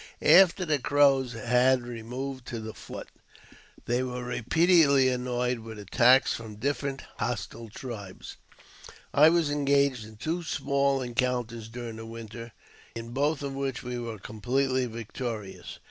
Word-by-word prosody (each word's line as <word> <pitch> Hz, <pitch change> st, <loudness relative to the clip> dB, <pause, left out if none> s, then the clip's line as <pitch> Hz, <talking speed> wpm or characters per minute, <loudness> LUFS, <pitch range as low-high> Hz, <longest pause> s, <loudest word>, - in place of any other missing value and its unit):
After 185 Hz, -1 st, +6 dB
the 150 Hz, -3 st, +1 dB
Crows 135 Hz, -2 st, +3 dB
had 125 Hz, +2 st, +2 dB
removed 125 Hz, +3 st, -6 dB
to 115 Hz, -, -4 dB
the 110 Hz, 0 st, -7 dB
fort, -, -, -9 dB, 0.8 s
they 120 Hz, +1 st, +1 dB
were 125 Hz, -1 st, -4 dB
repeatedly 140 Hz, +2 st, +4 dB
annoyed 125 Hz, -1 st, -1 dB
with 110 Hz, -1 st, -9 dB
attacks 120 Hz, +6 st, +4 dB
from 110 Hz, -2 st, -7 dB
different 140 Hz, +4 st, -2 dB
hostile 115 Hz, 0 st, -4 dB
tribes. 105 Hz, -5 st, -8 dB, 0.8 s
I 150 Hz, +2 st, +7 dB
was 165 Hz, -3 st, +2 dB
engaged 140 Hz, -4 st, +2 dB
in 110 Hz, -, -13 dB
two 165 Hz, +9 st, -2 dB
small 140 Hz, -4 st, 0 dB
encounters 120 Hz, -2 st, -2 dB
during 115 Hz, -1 st, -7 dB
the 115 Hz, 0 st, -8 dB
winter, 115 Hz, +1 st, -8 dB, 0.4 s
in 115 Hz, 0 st, -6 dB
both 145 Hz, +3 st, 0 dB
of 140 Hz, -1 st, -3 dB
which 135 Hz, -2 st, -3 dB
we 125 Hz, 0 st, -4 dB
were 115 Hz, -2 st, -5 dB
completely 125 Hz, +5 st, -1 dB
victorious. 115 Hz, -2 st, -6 dB
125 Hz, 135 wpm, -28 LUFS, 115-140 Hz, 0.8 s, I